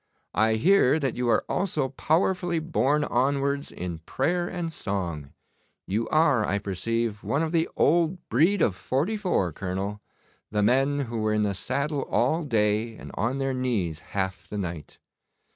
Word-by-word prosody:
'I 110 0 +3
hear 160 - +4
that 135 -5 -1
you 125 0 0
are - - +2
also 155 -8 -1
powerfully 175 +5 +1
borne 150 -2 +1
onwards 140 +2 0
in 90 -2 -5
prayer 175 - -1
and 170 -3 -4
song. 85 - -3 0.5
You 110 +4 -1
are, 150 -7 +4
I 100 -1 0
perceive, 110 +3 -2
one 145 +3 0
of 160 - -2
the 165 -1 +1
old 170 +3 +3
breed 165 - +3
of 95 - +2
'44, 155 - 0
Colonel 95 +4 -4 0.5
the 105 -1 +1
men 135 +5 +3
who 120 -4 -3
were 110 0 +1
in 105 - +2
the 100 -1 0
saddle 140 - -2
all 155 +8 +2
day, 110 -3 +1
and - - -10
on 120 +4 -1
their 135 -1 -1
knees 110 -11 -1 0.2
half 95 -1 -2
the 105 - -5
night. 85 -6 -5
125 Hz, 160 wpm, -26 LUFS, 105-155 Hz, 0.5 s, hear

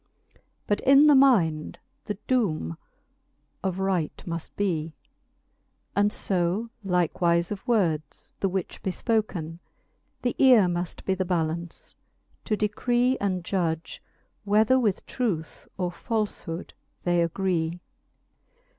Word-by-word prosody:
But 205 0 +1
in 275 +2 +7
the 300 - +7
mind 195 - +3 0.3
the 210 -2 -4
doome 160 - 0 0.9
of 190 -2 -1
right 190 -5 -1
muft 170 -2 -4
bee; 165 -6 -1 1.0
And 205 +1 +3
fo 190 +5 -1
likewife 175 -1 +1
of 205 +4 -6
words, 165 - 0
the 195 - +1
which 185 -1 -4
be - - -2
fpoken. 185 -6 -1 0.6
The 245 - 0
eare 250 -7 +7
muft 175 0 -3
be 190 - +2
the 190 0 -1
ballance, 170 -1 -3 0.5
to 215 - 0
decree 240 +5 +1
And 185 -3 -1
judge, 165 -4 -2 0.4
whether 215 +5 +4
with 210 -6 0
truth 195 -11 -3
or 180 -2 -1
falfhood 205 -5 -3 0.3
they 175 -1 +2
agree. 170 -1 -1
190 Hz, 115 wpm, -26 LUFS, 170-215 Hz, 1.0 s, in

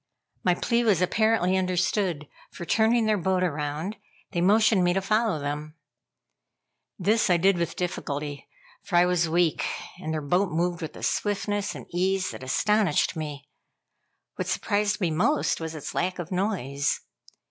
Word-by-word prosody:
My 180 -1 +3
plea 235 +5 +1
was 210 -7 +3
apparently 190 0 +2
understood, 180 -3 0 0.2
for 175 - -8
turning 225 +4 +3
their 215 -2 +2
boat 185 +1 +1
around, 155 +4 -2 0.3
they 170 - -1
motioned 210 +1 +4
me 175 0 +3
to 195 - +1
follow 215 -1 +1
them. 150 +2 -4 1.2
This 220 0 +2
I 175 - +5
did 185 +1 +3
with 170 - -2
difficulty, 145 -5 -4 0.3
for - - -4
I 175 +1 +6
was 175 -2 +1
weak, 170 -1 +2 0.4
and 160 -4 -4
their 160 - -1
boat 180 +6 +1
moved 170 +1 -1
with 160 - -6
a - - -10
swiftness 205 0 -1
and - - -8
ease 185 +2 0
that - - -9
astonished 200 +6 +1
me. 145 -3 -6 0.9
What - - -3
surprised 210 0 0
me 175 -3 +1
most 180 - +1
was 160 0 -4
its 150 - -6
lack 180 +1 -1
of 175 -1 -6
noise. 165 - -1
180 Hz, 160 wpm, -26 LUFS, 160-205 Hz, 1.2 s, I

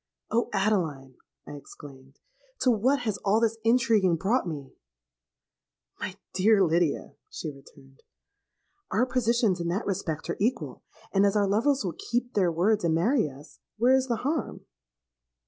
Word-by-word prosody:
'Oh! 235 +1 +1
Adeline,' 165 -11 -1 0.3
I - - -10
exclaimed, 140 -2 -12 0.4
'to 255 - +4
what 245 +5 +2
has 215 -4 -2
all 210 +2 +2
this 225 -1 0
intriguing 225 -6 +3
brought 195 +6 0
me?'—'My 60 - -12 0.2
dear 195 +2 +4
Lydia,' 170 -2 0 0.2
she 155 - -5
returned, 135 -1 -18 0.9
'our 245 - +2
positions 235 -6 +1
in 170 - -2
that 185 +6 -2
respect 175 -6 -3
are - - -4
equal; 235 +6 -1 0.3
and, 195 0 +4
as 200 0 +2
our 205 -1 +3
lovers 235 +5 +1
will 175 - -2 0.2
keep 245 +1 -1
their 185 -4 +2
words 200 +6 +1
and 165 -2 +2
marry 215 - +2
us, 140 +2 -15 0.2
where 245 +4 +4
is 265 0 +2
the 240 - 0
harm?' 295 -3 -2
195 Hz, 145 wpm, -27 LUFS, 160-230 Hz, 0.9 s, to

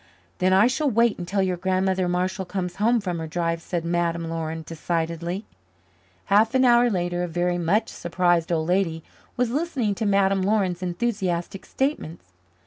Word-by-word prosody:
"Then 185 0 +2
I 190 +4 +6
shall 270 +4 +1
wait 230 -3 +2
until 190 +3 -1
your 185 -1 -1
Grandmother 185 0 0
Marshall 185 +2 -1
comes 180 -1 -4
home 230 +4 +3
from 180 -4 -3
her 160 - -4
drive," 165 0 -2
said 170 -1 -3
Madame 170 -1 -1
Laurin 160 0 -4
decidedly. 170 +4 -3 0.8
Half 220 +5 +3
an 260 0 +4
hour 240 0 +5
later 175 -3 -1
a 180 - -1
very 175 +1 -1
much 200 +7 +1
surprised 175 -1 0
old 160 -1 0
lady 175 -3 0 0.3
was 245 -2 +1
listening 275 -7 -1
to 215 +2 -2
Madame 195 -1 +3
Laurin's 190 -3 0
enthusiastic 185 -1 -2
statements. 175 - -3
185 Hz, 160 wpm, -24 LUFS, 170-205 Hz, 0.8 s, I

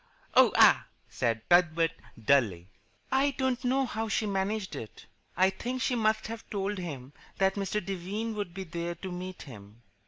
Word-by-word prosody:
"Oh, - - +7
ah!" - - +6 0.2
said 115 -2 -1
Cuthbert, 165 -2 +4 0.3
dully. 105 -8 +2 0.4
"I 275 +1 +2
don't 260 -1 0
know 265 +2 +2
how 225 -2 -3
she 215 +1 0
managed 195 -2 -2
it. 110 -6 -9 0.3
I 190 +2 +4
think 245 +6 -4
she 255 - 0
must 220 -2 +1
have 225 0 -7
told 200 0 -2
him 140 -6 -6 0.2
that 195 0 +3
Mr. 200 -1 -2
Devine 195 +4 -3
would 205 -4 -4
be 190 +2 -6
there 170 0 -4
to 190 +1 -7
meet 180 +1 -6
him." 110 -3 -13
190 Hz, 165 wpm, -29 LUFS, 165-220 Hz, 0.4 s, Oh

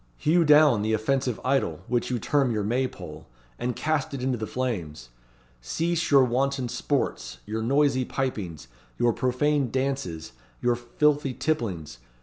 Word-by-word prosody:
Hew 170 +3 +3
down 150 -7 +6
the 110 +1 0
offensive 125 +2 0
idol, 130 - 0
which 120 0 0
you 125 - 0
term 140 +2 +1
your 110 -3 -1
May 125 +5 +1
pole, - - -10 0.3
and 125 0 -2
cast 150 -3 -1
it 130 - -5
into 130 -1 +1
the 110 -2 -4
flames! 85 - -4 0.5
Cease 165 - -1
your 140 -2 +6
wanton 130 +1 0
sports, 120 - -2
your 110 +1 -3
noisy 135 +2 +2
pipings, 105 - -3 0.3
your 120 -1 +2
profane 130 +3 +1
dances, 130 -11 -2 0.3
your 120 0 +2
filthy 140 +3 0
tipplings. 95 - -2
125 Hz, 145 wpm, -26 LUFS, 110-140 Hz, 0.5 s, down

